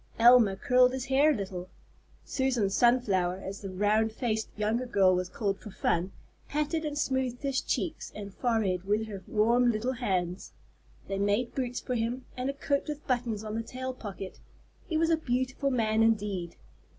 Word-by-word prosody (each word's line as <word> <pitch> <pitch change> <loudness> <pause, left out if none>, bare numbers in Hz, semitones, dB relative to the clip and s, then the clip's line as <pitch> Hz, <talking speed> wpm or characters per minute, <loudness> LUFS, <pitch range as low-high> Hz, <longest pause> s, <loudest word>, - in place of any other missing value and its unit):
Elma 235 -4 +7
curled 250 +5 +4
his 260 -1 -3
hair 275 +3 +4
a 305 - +3
little. 185 -3 -5 0.6
Susan 250 -7 0
Sunflower, 200 -7 +3
as 195 +1 -6
the 195 - -5
round 210 +4 +2
faced 220 -2 -2
younger 220 +4 0
girl 195 -5 +4
was 180 0 -1
called 200 -2 -2
for - - -10
fun, 185 -1 0 0.4
patted 300 +2 -1
and 295 -1 -3
smoothed 260 -2 -1
his 275 -1 0
cheeks 320 -3 -3
and 200 -2 -7
forehead 215 -8 0
with 210 +2 +1
her 200 -3 -7
warm 235 +3 +3
little 235 +4 -1
hands. 185 -7 -2 0.5
They 195 0 -2
made 205 +4 +1
boots 250 -2 -2
for 250 - -4
him, 240 +2 -2
and 255 +1 -2
a - - -1
coat 280 0 -1
with 300 0 -5
buttons 240 -5 -1
on 215 -1 -5
the 225 - -1
tail 260 +3 -5
pocket; 200 -5 -8 0.5
he 320 - 0
was 330 +1 +2
a 325 - +4
beautiful 260 0 -1
man 220 -4 +1
indeed! 205 -6 +1
230 Hz, 175 wpm, -29 LUFS, 200-255 Hz, 0.6 s, Elma